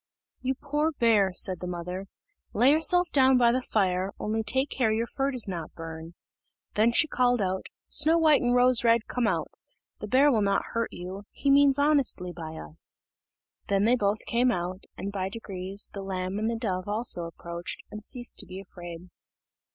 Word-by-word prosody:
"You 260 Hz, +1 st, -1 dB
poor 295 Hz, +3 st, -1 dB
bear," 220 Hz, -7 st, +3 dB
said 185 Hz, -3 st, +1 dB
the 180 Hz, -, -5 dB
mother, 180 Hz, +2 st, -5 dB, 0.5 s
"lay 245 Hz, +6 st, +5 dB
yourself 350 Hz, +3 st, +3 dB
down 265 Hz, -2 st, +5 dB
before 235 Hz, -1 st, +4 dB
the 255 Hz, -, 0 dB
fire, 190 Hz, -4 st, 0 dB
only 220 Hz, +1 st, -1 dB
take 265 Hz, +6 st, +1 dB
care 240 Hz, -4 st, +1 dB
your 225 Hz, +2 st, 0 dB
fur 270 Hz, +3 st, -2 dB
does 255 Hz, -6 st, +2 dB
not 170 Hz, -4 st, -6 dB
burn." 165 Hz, 0 st, -8 dB, 0.6 s
Then 220 Hz, +3 st, +3 dB
she 315 Hz, +7 st, +3 dB
called 245 Hz, -3 st, +2 dB
out, 190 Hz, -1 st, -2 dB, 0.2 s
"Snow 315 Hz, +3 st, +4 dB
white 310 Hz, -3 st, +4 dB
and 245 Hz, 0 st, +2 dB
Rose 250 Hz, -1 st, +4 dB
red, 230 Hz, -1 st, +4 dB
come 245 Hz, -3 st, 0 dB
out; 170 Hz, -6 st, -1 dB, 0.5 s
the 210 Hz, -, -6 dB
bear 275 Hz, +6 st, +4 dB
will 225 Hz, -4 st, +2 dB
not 200 Hz, -1 st, +1 dB
hurt 230 Hz, 0 st, -1 dB
you 185 Hz, +3 st, -8 dB
he 280 Hz, -, 0 dB
means 280 Hz, 0 st, +5 dB
honestly 280 Hz, -11 st, +2 dB
by 160 Hz, -2 st, -7 dB
us." 75 Hz, -, -7 dB, 0.7 s
Then 200 Hz, 0 st, +2 dB
they 235 Hz, +3 st, +4 dB
both 205 Hz, -3 st, +1 dB
came 245 Hz, +2 st, +2 dB
out, 180 Hz, -1 st, -4 dB
and, 200 Hz, -, -4 dB
by 190 Hz, -1 st, -3 dB
degrees, 195 Hz, -2 st, -5 dB
the 200 Hz, -, -5 dB
lamb 190 Hz, 0 st, -3 dB
and 220 Hz, +1 st, 0 dB
the 230 Hz, -, -1 dB
dove 185 Hz, -5 st, -3 dB
also 205 Hz, -5 st, 0 dB
approached, 170 Hz, +1 st, -7 dB
and 210 Hz, 0 st, -8 dB
ceased 245 Hz, 0 st, -3 dB
to -, -, -1 dB
be 185 Hz, -, -8 dB
afraid. 175 Hz, -2 st, -10 dB
215 Hz, 190 wpm, -27 LUFS, 185-255 Hz, 0.7 s, lay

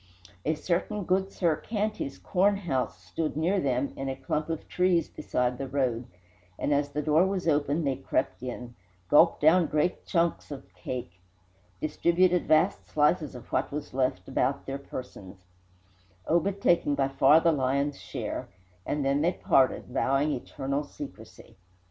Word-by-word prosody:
A 160 Hz, -, +1 dB
certain 180 Hz, +5 st, -2 dB
Goodsir 185 Hz, -3 st, +1 dB
Canty's 215 Hz, -9 st, -3 dB
cornhouse 185 Hz, -, 0 dB
stood 150 Hz, -, -3 dB
near 180 Hz, +5 st, +2 dB
them 135 Hz, -2 st, 0 dB
in 135 Hz, 0 st, -4 dB
a 135 Hz, -, -3 dB
clump 150 Hz, +4 st, -3 dB
of 165 Hz, -1 st, -4 dB
trees 180 Hz, -3 st, +2 dB
beside 125 Hz, 0 st, -2 dB
the 135 Hz, -, -3 dB
road, 130 Hz, -3 st, -1 dB, 0.5 s
and 145 Hz, -, 0 dB
as 145 Hz, 0 st, +1 dB
the 150 Hz, +1 st, -3 dB
door 155 Hz, +5 st, +4 dB
was 190 Hz, -2 st, -2 dB
open 145 Hz, +1 st, +1 dB
they 135 Hz, -2 st, 0 dB
crept 130 Hz, -, -2 dB
in, 125 Hz, -1 st, -6 dB, 0.4 s
gulped 165 Hz, +3 st, +5 dB
down 165 Hz, +2 st, +5 dB
great 155 Hz, +5 st, -1 dB
"chunks" 170 Hz, -1 st, 0 dB
of 140 Hz, -2 st, -9 dB
cake, 90 Hz, -9 st, -6 dB, 0.6 s
distributed 175 Hz, +3 st, +2 dB
vast 155 Hz, 0 st, +3 dB
slices 150 Hz, -1 st, +1 dB
of 125 Hz, -, -11 dB
what -, -, 0 dB
was 145 Hz, -1 st, -5 dB
left 130 Hz, -8 st, -1 dB
about 140 Hz, +1 st, 0 dB
their 135 Hz, +1 st, -4 dB
persons, 95 Hz, -9 st, -9 dB, 0.8 s
Obed 185 Hz, +4 st, +1 dB
taking 170 Hz, -6 st, +3 dB
by 135 Hz, -1 st, +1 dB
far 135 Hz, +3 st, +5 dB
the 165 Hz, 0 st, +3 dB
lion's 140 Hz, 0 st, 0 dB
share, -, -, -5 dB, 0.4 s
and 145 Hz, -1 st, -1 dB
then 140 Hz, +1 st, +2 dB
they 175 Hz, +3 st, +2 dB
parted, 130 Hz, -5 st, +2 dB
vowing 135 Hz, +3 st, +1 dB
eternal 140 Hz, +1 st, -3 dB
secrecy. 145 Hz, -, -11 dB
145 Hz, 150 wpm, -28 LUFS, 135-170 Hz, 0.8 s, gulped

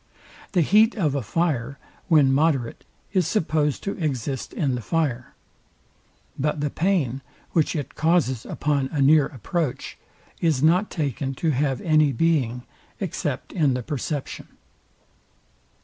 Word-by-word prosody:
The 180 Hz, -, +4 dB
heat 215 Hz, -, +4 dB
of 160 Hz, -, 0 dB
a 140 Hz, -, -1 dB
fire, 140 Hz, -, -1 dB, 0.3 s
when 150 Hz, -6 st, +5 dB
moderate, 135 Hz, -5 st, 0 dB, 0.3 s
is 185 Hz, -5 st, +2 dB
supposed 155 Hz, -7 st, 0 dB
to 200 Hz, -, -2 dB
exist 135 Hz, -2 st, -3 dB
in 140 Hz, -4 st, -1 dB
the 125 Hz, -, -3 dB
fire; 130 Hz, -3 st, -2 dB, 1.0 s
but 150 Hz, +2 st, 0 dB
the 145 Hz, -1 st, -1 dB
pain, 160 Hz, -8 st, 0 dB, 0.3 s
which 160 Hz, -1 st, +1 dB
it 145 Hz, -2 st, -4 dB
causes 155 Hz, -7 st, +1 dB
upon 145 Hz, -3 st, -1 dB
a 150 Hz, -, -2 dB
near 145 Hz, +1 st, +5 dB
approach, 150 Hz, -, -4 dB, 0.4 s
is 155 Hz, -5 st, +1 dB
not 180 Hz, +6 st, +3 dB
taken 140 Hz, -, -3 dB
to 160 Hz, +3 st, 0 dB
have 135 Hz, -1 st, 0 dB
any 155 Hz, -3 st, +3 dB
being, 125 Hz, -4 st, +1 dB, 0.4 s
except -, -, -3 dB
in 145 Hz, -7 st, +2 dB
the 125 Hz, -, -3 dB
perception. 145 Hz, +1 st, -4 dB
150 Hz, 135 wpm, -24 LUFS, 135-165 Hz, 1.0 s, when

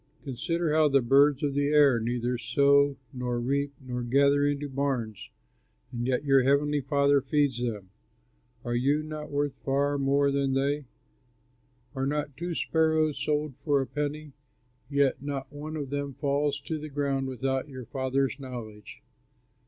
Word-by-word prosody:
Consider 160 Hz, +5 st, -2 dB
how 155 Hz, -1 st, +5 dB
the 140 Hz, -1 st, +4 dB
birds 140 Hz, +3 st, +4 dB
of 145 Hz, -1 st, 0 dB
the 145 Hz, 0 st, +1 dB
air 145 Hz, -4 st, +5 dB
neither 120 Hz, +2 st, -1 dB
sow 140 Hz, +4 st, +3 dB, 0.2 s
nor 125 Hz, -1 st, -2 dB
reap 140 Hz, +3 st, -1 dB
nor 125 Hz, -2 st, -5 dB
gather 140 Hz, +3 st, +3 dB
into 145 Hz, 0 st, -1 dB
barns, 130 Hz, -6 st, -3 dB, 0.6 s
and 120 Hz, 0 st, -3 dB
yet 130 Hz, +2 st, 0 dB
your 135 Hz, -1 st, +5 dB
heavenly 145 Hz, +2 st, +2 dB
Father 140 Hz, +1 st, +3 dB
feeds 140 Hz, -2 st, +1 dB
them. 105 Hz, -6 st, -4 dB, 0.7 s
Are 120 Hz, -, -2 dB
you 140 Hz, +5 st, +1 dB
not 155 Hz, 0 st, -7 dB
worth 145 Hz, -1 st, -1 dB
far 140 Hz, +1 st, +1 dB
more 140 Hz, +1 st, +2 dB
than 140 Hz, -1 st, 0 dB
they? 140 Hz, +2 st, 0 dB, 1.1 s
Are 135 Hz, -1 st, -2 dB
not 145 Hz, -1 st, -2 dB
two 170 Hz, +3 st, -4 dB
sparrows 160 Hz, -2 st, +1 dB
sold 150 Hz, -1 st, -1 dB
for 145 Hz, -3 st, +1 dB
a 135 Hz, -, -1 dB
penny? 150 Hz, +1 st, -4 dB, 0.6 s
Yet 140 Hz, -2 st, +1 dB
not 140 Hz, -1 st, -5 dB
one 150 Hz, +2 st, -6 dB
of 140 Hz, -3 st, -5 dB
them 140 Hz, -1 st, -3 dB
falls 145 Hz, +1 st, 0 dB
to 155 Hz, +2 st, -4 dB
the 155 Hz, +1 st, -7 dB
ground 140 Hz, -1 st, -1 dB
without 130 Hz, +2 st, -2 dB
your 130 Hz, -3 st, -8 dB
Father's 135 Hz, +3 st, -1 dB
knowledge. 115 Hz, -6 st, -9 dB
140 Hz, 155 wpm, -28 LUFS, 130-145 Hz, 1.1 s, how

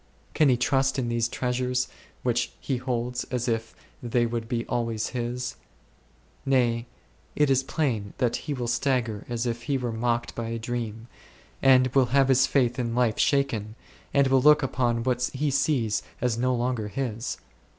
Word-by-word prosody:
Can 150 Hz, -3 st, +4 dB
he 125 Hz, -, +4 dB
trust 135 Hz, +1 st, +1 dB
in 125 Hz, -3 st, -1 dB
these 120 Hz, 0 st, +1 dB
treasures 125 Hz, +1 st, -1 dB, 0.4 s
which 120 Hz, -1 st, 0 dB
he 135 Hz, -, -2 dB
holds 125 Hz, -1 st, -2 dB
as 125 Hz, -1 st, -3 dB
if 115 Hz, -1 st, -2 dB, 0.3 s
they 120 Hz, 0 st, +1 dB
would 115 Hz, -1 st, -3 dB
be 115 Hz, -2 st, -1 dB
always 115 Hz, -2 st, -1 dB
his? 125 Hz, 0 st, -3 dB, 0.9 s
Nay, 120 Hz, -3 st, +1 dB, 0.5 s
it 150 Hz, -2 st, +3 dB
is 135 Hz, -1 st, +4 dB
plain 125 Hz, -8 st, -2 dB
that 120 Hz, -2 st, +1 dB
he 150 Hz, -2 st, -4 dB
will 120 Hz, -2 st, -3 dB
stagger 120 Hz, -4 st, 0 dB
as 120 Hz, 0 st, -2 dB
if 120 Hz, 0 st, -2 dB
he 140 Hz, -, +2 dB
were 125 Hz, -2 st, -2 dB
mocked 120 Hz, +1 st, -1 dB
by 115 Hz, -1 st, -4 dB
a 115 Hz, 0 st, -3 dB
dream, 115 Hz, -1 st, -4 dB, 0.5 s
and 130 Hz, -1 st, +6 dB
will 135 Hz, -2 st, +4 dB
have 135 Hz, -1 st, +4 dB
his 130 Hz, 0 st, +5 dB
faith 125 Hz, -2 st, +1 dB
in 115 Hz, -1 st, -1 dB
life 120 Hz, -3 st, +1 dB
shaken, 115 Hz, -7 st, +1 dB, 0.4 s
and 140 Hz, -1 st, +4 dB
will 130 Hz, -1 st, +4 dB
look 150 Hz, +1 st, +6 dB
upon 120 Hz, -3 st, 0 dB
what 125 Hz, 0 st, 0 dB
he 145 Hz, +2 st, 0 dB
sees 130 Hz, -6 st, +1 dB, 0.2 s
as 125 Hz, -2 st, +1 dB
no 125 Hz, +2 st, +1 dB
longer 120 Hz, -3 st, -1 dB
his. 115 Hz, -1 st, -3 dB
125 Hz, 170 wpm, -26 LUFS, 115-130 Hz, 0.9 s, and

